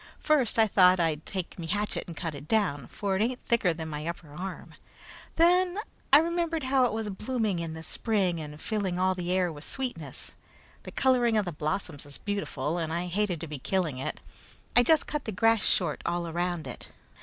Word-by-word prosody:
First 285 Hz, -8 st, +3 dB
I 225 Hz, -, +6 dB
thought 185 Hz, -3 st, +5 dB
I'd 160 Hz, -2 st, 0 dB
take 185 Hz, -2 st, -4 dB
me 165 Hz, -, -5 dB
hatchet 205 Hz, +5 st, -1 dB
and 170 Hz, -, -8 dB
cut 165 Hz, -3 st, -3 dB
it 145 Hz, +1 st, -9 dB
down, 180 Hz, -, +1 dB
for 200 Hz, -2 st, -2 dB
it 190 Hz, -, +1 dB
ain't 245 Hz, +3 st, 0 dB
thicker 225 Hz, -6 st, +3 dB
than 160 Hz, -1 st, -5 dB
me 150 Hz, +1 st, -4 dB
upper 170 Hz, -3 st, -6 dB
arm. 185 Hz, +4 st, -6 dB, 0.6 s
Then 360 Hz, +2 st, +4 dB, 0.3 s
I 280 Hz, -, +10 dB
remembered 335 Hz, 0 st, +1 dB
how 260 Hz, -1 st, +3 dB
it 245 Hz, -, +1 dB
was 220 Hz, -1 st, -2 dB
blooming 215 Hz, -2 st, -1 dB
in 165 Hz, -1 st, -4 dB
the 160 Hz, -, -8 dB
spring 190 Hz, -2 st, 0 dB
and 150 Hz, 0 st, -8 dB
filling 200 Hz, -4 st, -1 dB
all 185 Hz, +1 st, +3 dB
the 180 Hz, -1 st, -3 dB
air 180 Hz, -2 st, +2 dB
with 145 Hz, 0 st, -9 dB
sweetness. 260 Hz, +5 st, -4 dB, 0.5 s
The -, -, -9 dB
coloring 245 Hz, -4 st, +3 dB
of 210 Hz, -, +2 dB
the 175 Hz, -, -3 dB
blossoms 150 Hz, -1 st, -3 dB
is 140 Hz, -, -9 dB
beautiful, 200 Hz, -5 st, -2 dB
and 160 Hz, -1 st, -2 dB
I 170 Hz, +2 st, -1 dB
hated 180 Hz, -1 st, 0 dB
to 165 Hz, -, -4 dB
be 150 Hz, -2 st, -6 dB
killing 160 Hz, -4 st, -1 dB
it. 135 Hz, -, -4 dB, 0.5 s
I 245 Hz, -, +8 dB
just 310 Hz, +5 st, +4 dB
cut 300 Hz, -2 st, -3 dB
the 220 Hz, -, -2 dB
grass 225 Hz, +2 st, +3 dB
short 170 Hz, -5 st, +1 dB
all 175 Hz, 0 st, -1 dB
around 175 Hz, 0 st, -2 dB
it. -, -, -7 dB
185 Hz, 205 wpm, -28 LUFS, 165-225 Hz, 0.6 s, I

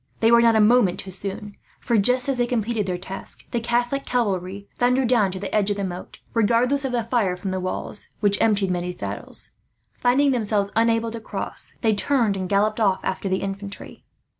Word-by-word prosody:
They 225 Hz, +1 st, +4 dB
were 235 Hz, 0 st, +7 dB
not 230 Hz, -1 st, +4 dB
a -, -, +4 dB
moment 210 Hz, -4 st, +4 dB
too 190 Hz, -, -6 dB
soon 195 Hz, +2 st, -6 dB, 0.2 s
for, 235 Hz, -, -1 dB
just 250 Hz, +5 st, +3 dB
as 270 Hz, -2 st, -1 dB
they 240 Hz, -, +2 dB
completed 225 Hz, -3 st, -1 dB
their 180 Hz, -1 st, -1 dB
task, 190 Hz, +2 st, -8 dB
the 240 Hz, -, 0 dB
Catholic 240 Hz, +4 st, 0 dB
cavalry 200 Hz, -4 st, -2 dB
thundered 250 Hz, +1 st, +2 dB
down 215 Hz, -6 st, +3 dB
to 190 Hz, -, -5 dB
the 195 Hz, -, -6 dB
edge 210 Hz, -1 st, +2 dB
of 205 Hz, -, -1 dB
the 200 Hz, -, -2 dB
moat; 180 Hz, -1 st, -6 dB, 0.2 s
regardless 240 Hz, +5 st, +2 dB
of 265 Hz, -, -2 dB
the 240 Hz, -2 st, 0 dB
fire 220 Hz, -6 st, 0 dB
from 185 Hz, +1 st, -4 dB
the 185 Hz, -, -2 dB
walls, 185 Hz, +2 st, -4 dB
which 205 Hz, -1 st, +2 dB
emptied 205 Hz, -4 st, +2 dB
many 180 Hz, 0 st, -2 dB
saddles. -, -, -3 dB, 0.4 s
Finding 270 Hz, +3 st, +3 dB
themselves 210 Hz, -4 st, 0 dB
unable 230 Hz, 0 st, +2 dB
to 230 Hz, -, -6 dB
cross, 220 Hz, -, -2 dB
they 220 Hz, -2 st, +3 dB
turned 225 Hz, 0 st, +2 dB
and 185 Hz, -1 st, -4 dB
galloped 210 Hz, +2 st, +1 dB
off 195 Hz, -4 st, +2 dB
after 190 Hz, +1 st, -2 dB
the 190 Hz, -, -1 dB
infantry. 195 Hz, +1 st, -7 dB
215 Hz, 205 wpm, -23 LUFS, 195-240 Hz, 0.4 s, were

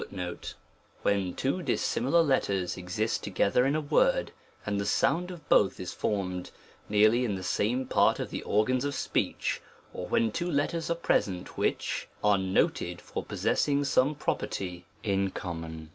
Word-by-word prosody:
* -, -, -32 dB
when 95 Hz, -3 st, +1 dB
two 140 Hz, +8 st, -1 dB
dissimilar 165 Hz, 0 st, +2 dB
letters 100 Hz, -, +1 dB
exist 95 Hz, +5 st, -2 dB
together 100 Hz, +5 st, +2 dB
in 140 Hz, -, +1 dB
a 155 Hz, -, +1 dB
word, -, -, +2 dB, 0.3 s
and 100 Hz, -1 st, -1 dB
the -, -, -2 dB
sound 165 Hz, -, +2 dB
of 175 Hz, -3 st, -10 dB
both 95 Hz, -1 st, +4 dB
is 90 Hz, -, -5 dB
formed, 90 Hz, -4 st, -2 dB, 0.4 s
nearly 110 Hz, +4 st, +4 dB
in 105 Hz, -5 st, 0 dB
the 95 Hz, -, -6 dB
same 120 Hz, +8 st, 0 dB
part -, -, +3 dB
of -, -, -4 dB
the -, -, -3 dB
organs 125 Hz, +5 st, +1 dB
of 145 Hz, -1 st, -2 dB
speech, -, -, -1 dB, 0.3 s
or -, -, -5 dB
when 115 Hz, -1 st, +2 dB
two 175 Hz, +9 st, -2 dB
letters 165 Hz, +3 st, 0 dB
are 170 Hz, -, +2 dB
present 95 Hz, -, 0 dB
which, -, -, -1 dB, 0.2 s
are 105 Hz, -2 st, +4 dB
noted 95 Hz, -2 st, 0 dB
for -, -, -5 dB
possessing 145 Hz, 0 st, +1 dB
some 140 Hz, +1 st, +2 dB
property 90 Hz, -9 st, -3 dB, 0.2 s
in 100 Hz, -3 st, +1 dB
common. 80 Hz, -4 st, -6 dB
105 Hz, 160 wpm, -29 LUFS, 95-140 Hz, 0.4 s, both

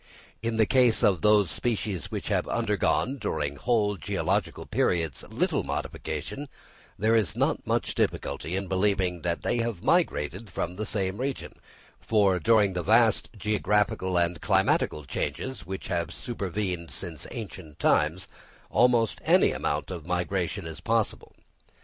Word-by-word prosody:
In 115 Hz, 0 st, -1 dB
the 110 Hz, -1 st, +4 dB
case 125 Hz, -2 st, +3 dB
of 95 Hz, -6 st, +3 dB
those 105 Hz, -5 st, +4 dB
species 105 Hz, -4 st, -2 dB
which -, -, -4 dB
have -, -, +1 dB
undergone, 135 Hz, +2 st, 0 dB
during 70 Hz, -9 st, -2 dB
whole 105 Hz, -3 st, +1 dB
geological 75 Hz, -, -1 dB
periods, 80 Hz, -6 st, 0 dB
little -, -, 0 dB
modification, 80 Hz, -, -4 dB, 0.5 s
there 110 Hz, +3 st, +3 dB
is 105 Hz, -11 st, +1 dB
not -, -, 0 dB
much -, -, 0 dB
difficulty 85 Hz, -, -1 dB
in 100 Hz, +1 st, -2 dB
believing 95 Hz, -2 st, +1 dB
that 85 Hz, 0 st, -2 dB
they 120 Hz, -, 0 dB
have 115 Hz, -6 st, -2 dB
migrated 95 Hz, +9 st, +1 dB
from 90 Hz, 0 st, -3 dB
the 110 Hz, +3 st, -4 dB
same 95 Hz, -2 st, -1 dB
region; 135 Hz, +2 st, -3 dB, 0.5 s
for 100 Hz, -4 st, +2 dB
during 105 Hz, +1 st, +4 dB
the 90 Hz, -, -1 dB
vast 110 Hz, +3 st, +3 dB
geographical 105 Hz, -3 st, +1 dB
and 85 Hz, -2 st, +1 dB
climatical 75 Hz, -1 st, +2 dB
changes 130 Hz, -, -4 dB
which 95 Hz, +1 st, -5 dB
have 85 Hz, -2 st, -1 dB
supervened 95 Hz, -6 st, -3 dB
since 75 Hz, +3 st, -4 dB
ancient 95 Hz, -, -8 dB
times, 85 Hz, +6 st, +2 dB, 0.4 s
almost 120 Hz, -2 st, +3 dB
any -, -, +5 dB
amount 75 Hz, +5 st, -2 dB
of 85 Hz, -3 st, -7 dB
migration 90 Hz, +1 st, -1 dB
is 80 Hz, 0 st, -7 dB
possible. 115 Hz, +2 st, -1 dB
95 Hz, 140 wpm, -27 LUFS, 85-110 Hz, 0.5 s, any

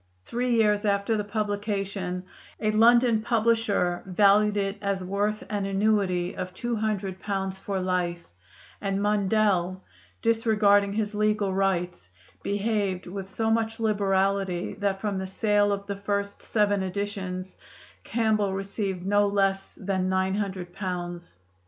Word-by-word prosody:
Three 245 Hz, 0 st, 0 dB
years 210 Hz, -2 st, +3 dB
after 200 Hz, +1 st, +1 dB
the 210 Hz, -, -1 dB
publication, 205 Hz, -3 st, -2 dB, 0.4 s
a 215 Hz, -1 st, +1 dB
London 230 Hz, +1 st, +5 dB
publisher 220 Hz, -6 st, +1 dB
valued 205 Hz, +2 st, +4 dB
it 195 Hz, 0 st, -1 dB
as 200 Hz, -2 st, -1 dB
worth 205 Hz, +3 st, -1 dB
an 205 Hz, -2 st, -2 dB
annuity 195 Hz, -3 st, +1 dB
of 185 Hz, 0 st, -5 dB
two 240 Hz, +2 st, -2 dB
hundred 200 Hz, -3 st, -2 dB
pounds 195 Hz, -1 st, -2 dB
for 195 Hz, 0 st, -3 dB
life; 180 Hz, -2 st, -1 dB, 0.6 s
and 195 Hz, -1 st, -1 dB
Mundell, 200 Hz, -3 st, +1 dB, 0.4 s
disregarding 210 Hz, -3 st, +3 dB
his 210 Hz, 0 st, -1 dB
legal 210 Hz, -2 st, +1 dB
rights, 180 Hz, -, -1 dB, 0.3 s
behaved 200 Hz, -2 st, -1 dB
with 190 Hz, +1 st, -6 dB
so 225 Hz, +2 st, 0 dB
much 225 Hz, 0 st, 0 dB
liberality 195 Hz, -3 st, +1 dB
that 200 Hz, -1 st, 0 dB
from 200 Hz, -2 st, -2 dB
the 190 Hz, -, -4 dB
sale 205 Hz, +1 st, +2 dB
of 200 Hz, 0 st, -2 dB
the 200 Hz, 0 st, -3 dB
first 200 Hz, 0 st, -3 dB
seven 205 Hz, -2 st, +1 dB
editions 190 Hz, -1 st, -4 dB, 0.5 s
Campbell 215 Hz, -4 st, +1 dB
received 195 Hz, -1 st, -3 dB
no 205 Hz, +1 st, +3 dB
less 195 Hz, -1 st, 0 dB
than 190 Hz, -2 st, -1 dB
nine 190 Hz, 0 st, +1 dB
hundred 190 Hz, -3 st, -3 dB
pounds. 175 Hz, -, -5 dB
200 Hz, 135 wpm, -26 LUFS, 190-210 Hz, 0.6 s, London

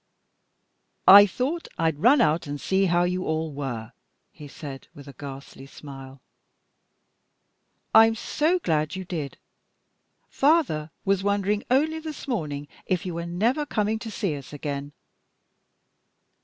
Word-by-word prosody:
"I 200 Hz, +2 st, +10 dB
thought 275 Hz, -, -3 dB
I'd 160 Hz, -3 st, 0 dB
run 250 Hz, -, +5 dB
out 155 Hz, +1 st, +1 dB
and 145 Hz, 0 st, -5 dB
see 190 Hz, +5 st, +1 dB
how 175 Hz, 0 st, +2 dB
you 180 Hz, +1 st, -1 dB
all 160 Hz, -2 st, -2 dB
were," 125 Hz, -6 st, -5 dB, 0.4 s
he 150 Hz, -, -11 dB
said, 140 Hz, -1 st, -9 dB
with 145 Hz, 0 st, -12 dB
a 140 Hz, -, -10 dB
ghastly 135 Hz, 0 st, -10 dB
smile. 135 Hz, -2 st, -11 dB, 1.7 s
"I'm 225 Hz, 0 st, +7 dB
so 310 Hz, +9 st, 0 dB
glad 155 Hz, -, -1 dB
you 190 Hz, 0 st, -6 dB
did! 155 Hz, -6 st, -5 dB, 0.9 s
Father 270 Hz, -, +2 dB, 0.2 s
was 195 Hz, -1 st, +2 dB
wondering 205 Hz, +1 st, 0 dB
only 310 Hz, +5 st, +2 dB
this 310 Hz, -3 st, -8 dB
morning 150 Hz, -, -3 dB, 0.2 s
if 185 Hz, +1 st, -1 dB
you 180 Hz, -, -4 dB
were 170 Hz, +1 st, -4 dB
never 225 Hz, -, 0 dB
coming 220 Hz, -5 st, -1 dB
to 225 Hz, -, -7 dB
see 200 Hz, -7 st, -2 dB
us 140 Hz, -2 st, -10 dB
again." 145 Hz, -1 st, -5 dB
175 Hz, 135 wpm, -25 LUFS, 145-220 Hz, 1.7 s, I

